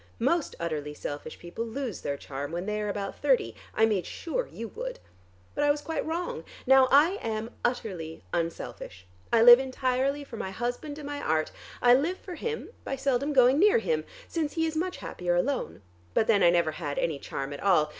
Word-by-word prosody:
Most 285 +7 +1
utterly 150 -3 -3
selfish 145 0 -6
people 175 +6 -5
lose 235 -1 -4
their 140 0 -2
charm 140 +1 -6
when 175 +2 -3
they 210 0 -2
are 210 - -2
about 200 -1 -4
thirty. 255 - +2 0.2
I 220 - +5
made 205 -5 0
sure 470 +9 -3
you 230 - -7
would. - - -5 0.6
But - - 0
I 290 - +4
was 290 0 +1
quite 325 - -2
wrong. 325 - -3 0.2
Now 265 0 +7
I 315 +9 +5
am 220 0 -3
utterly 180 - -3
unselfish: 165 - -4 0.3
I 230 -1 +5
live 240 +1 +11
entirely 265 +2 0
for 255 -5 -9
my 190 - -3
husband 245 +9 -4
and 300 - -8
my 290 0 -4
art. 155 - 0 0.3
I 245 0 +8
live 315 +9 +2
for 365 - -9
him 455 +7 -4
by 270 - -3
seldom 270 +1 0
going 260 0 +5
near 420 +5 +6
him, 470 0 0 0.2
since 315 -3 -2
he 325 -1 +1
is 320 -1 -2
much 360 +3 -1
happier 175 -1 -2
alone. 245 - -1 0.3
But - - +4
then 210 -3 +4
I 175 - +7
never 170 -2 +3
had 150 -3 -4
any 155 -4 0
charm 140 +1 -5
at 145 - -7
all. 175 -6 +4
240 Hz, 200 wpm, -28 LUFS, 175-290 Hz, 0.6 s, live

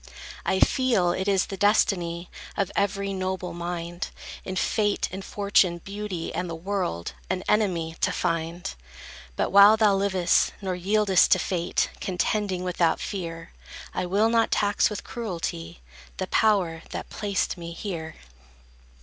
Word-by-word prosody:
I 190 - +2
feel 230 -10 +3
it 190 +2 -2
is 195 -2 +3
the 195 - -6
destiny 175 -4 +1 0.3
Of 195 -1 0
every 200 0 0
noble 185 -2 -3
mind, 175 0 -4 0.4
In 185 - -5
Fate, 205 +2 +1
in 190 +1 -5
Fortune, 200 -3 +2
Beauty, 195 -1 -5
and 180 - -2
the 165 - -4
World, 165 - -3 0.2
An 185 0 -1
enemy 175 -6 +1
to - - +2
find: 165 0 -2 0.6
But - - 0
while 200 +3 +8
thou 215 -2 +4
liv'st, 190 -3 +2
nor 190 -2 -2
yield'st 195 +1 +3
to - - +3
Fate, 175 -2 -1
Contending 185 0 -1
without 175 -2 +1
fear, 165 -4 -5 0.4
I 180 - -2
will 205 +5 +3
not 230 0 +3
tax 205 -1 +2
with 210 - -5
cruelty 165 - -5 0.4
The - - -1
power 185 -7 +2
that - - -6
placed 205 -2 -1
me 170 -2 -7
here. 165 -4 -5
185 Hz, 140 wpm, -26 LUFS, 170-200 Hz, 0.6 s, while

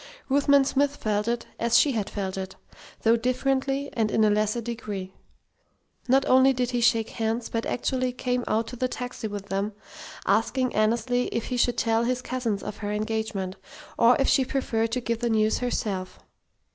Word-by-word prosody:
Ruthven 280 0 +4
Smith 285 +1 +1
felt 210 -2 -1
it, 235 0 -1
as 235 +1 +3
she 280 +3 +4
had 215 -5 -2
felt 190 -2 -4
it, 190 0 -5 0.5
though 225 +1 +5
differently 270 +3 0
and 225 -3 +1
in 220 - +2
a 210 - +4
lesser 215 +2 +1
degree. 215 -5 -5 0.9
Not 265 +2 +4
only 260 +1 +5
did 250 -1 -1
he 245 -1 0
shake 225 -1 +2
hands, 225 +1 -2
but 230 0 -2
actually 255 0 -1
came 250 0 -2
out 225 +1 +1
to - - -7
the 255 +1 0
taxi 250 -2 -5
with 205 -1 -7
them, 200 +2 -1 0.5
asking 245 +5 +1
Annesley 235 +3 +1
if 230 - -3
he 250 - -1
should 240 0 +2
tell 225 0 +2
his 250 +1 -1
cousins 240 -6 -2
of 210 0 -6
her 205 -1 -4
engagement, 210 -3 -2 0.4
or 235 +2 +5
if 275 - +2
she 270 -1 +4
preferred 230 -4 -1
to 250 - 0
give 230 -1 -2
the 240 - 0
news 220 -1 +2
herself? 200 -6 -2
230 Hz, 185 wpm, -26 LUFS, 215-255 Hz, 0.9 s, though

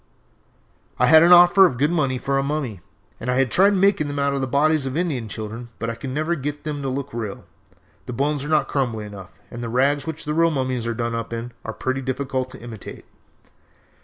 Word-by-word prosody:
"I 125 - +3
had 160 +4 +7
an 170 +2 +5
offer 175 +2 +8
of 125 - -5
good 145 +5 +2
money 140 -6 0
for 135 +2 -1
a - - +2
mummy, 140 -8 -3 0.4
and 125 - -5
had 125 0 +2
tried 200 +2 +4
making 195 -5 +3
them 145 - -4
from 140 -1 0
the 130 - -1
bodies 145 +2 +2
of 135 +3 -3
Indian 140 -11 -2
children, 110 +3 -6
but 115 0 -3
I 115 +4 -7
never 155 +6 -1
could 160 - -4
get 145 +1 -4
them 150 -3 -4
to 135 - -2
look 140 0 -4
real. 110 -4 -5 0.6
The 125 - -4
bones 140 +3 -1
are - - -5
not 155 -1 +2
crumbly 120 -6 -2
enough, 100 -3 -10 0.2
and 120 - -7
the 115 - -4
rags 140 +4 +1
which 160 0 -5
the 150 - -2
real 165 +1 +3
mummies 130 -5 -2
are 115 - -2
done 115 0 -2
up 115 -1 -4
in 115 +1 -5
are 110 - -4
pretty 130 +4 -3
difficult 130 0 -2
to - - -11
imitate. 115 -4 -9
135 Hz, 220 wpm, -22 LUFS, 120-150 Hz, 0.6 s, offer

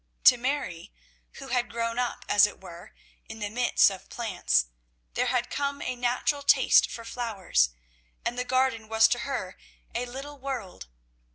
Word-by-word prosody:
To - - +9
Mary, 240 - -3 0.4
who 270 -1 -10
had 245 0 0
grown 230 +1 -2
up, 245 -1 -2
as 205 0 +6
it - - -11
were, 175 -2 -12 0.3
in 220 - -8
the 205 -2 -4
midst 245 -3 +4
of 190 - -10
plants, 120 - 0 0.5
there - - 0
had 245 -1 0
come 280 0 -2
a 255 - -3
natural 245 +4 0
taste 280 - +5
for 230 - -8
flowers, 205 - 0 0.6
and 240 - -1
the 250 - -1
garden 255 -3 0
was 220 0 +5
to 245 - +1
her 235 -7 -4 0.4
a 245 +1 -2
little 275 +3 -8
world. 245 - -6
240 Hz, 165 wpm, -27 LUFS, 210-255 Hz, 0.6 s, To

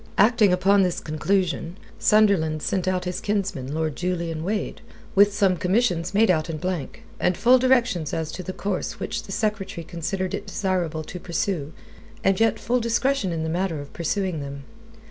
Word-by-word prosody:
Acting 210 -1 +5
upon 195 +2 +4
this 180 -2 +1
conclusion, 170 +2 -1 0.2
Sunderland 190 -8 +3
sent 185 -1 -1
out 185 -1 0
his 180 0 -3
kinsman, 195 -11 -2
Lord 155 -1 -1
Julian 170 -3 -2
Wade, 205 +4 -2 0.3
with 200 +1 +6
some 200 -2 +2
commissions 180 -1 +1
made 205 0 +4
out 155 -2 0
in 160 - -3
blank, 180 -3 -4 0.2
and 180 - +1
full 250 +2 +5
directions 245 - +2
as 160 -1 -2
to - - -6
the 185 - -5
course 195 0 -3
which - - -3
the - - -11
Secretary 195 -5 -2
considered 185 +3 -3
it 205 - -4
desirable 180 -5 -1
to 180 +3 -8
pursue 170 -3 -2 0.5
and 195 +1 +2
yet 225 -1 +3
full 250 +2 +1
discretion 235 -2 +1
in 160 -1 -2
the - - -2
matter 170 -1 -1
of 145 0 -9
pursuing 175 0 -1
them. 140 0 -6
185 Hz, 175 wpm, -24 LUFS, 165-205 Hz, 0.5 s, with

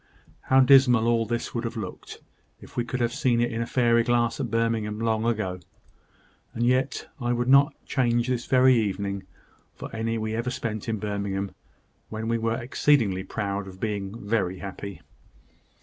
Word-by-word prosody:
How 130 0 +5
dismal 130 -3 +6
all 115 -1 +2
this 120 +1 -3
would 120 - -2
have 115 0 -4
looked, 100 -5 -7 0.4
if - - -15
we 120 - 0
could 125 +1 -4
have 120 0 0
seen 130 -5 +1
it 120 0 +1
in 115 - -2
a 115 - -2
fairy 120 -2 +3
glass 120 -1 +1
at - - -2
Birmingham 115 -2 -1
long 115 -1 0
ago! 105 -6 -1 1.0
and 120 - 0
yet 130 +2 +1
I 120 -1 0
would 120 0 -1
not 140 +2 +5
change 120 -2 +1
this 125 -2 -2
very 130 0 +5
evening 100 -3 -1 0.5
for - - -8
any 115 +1 -1
we 110 0 -3
ever 115 +2 -1
spent 110 -3 -4
in 110 - -1
Birmingham, 100 -1 -3 0.6
when 110 0 -4
we 115 0 0
were 115 0 0
exceedingly 120 -6 +2
proud 100 -1 -3
of 95 0 -11
being 105 0 -4
very 95 -4 0
happy." 100 -2 -7
115 Hz, 175 wpm, -26 LUFS, 105-120 Hz, 1.0 s, dismal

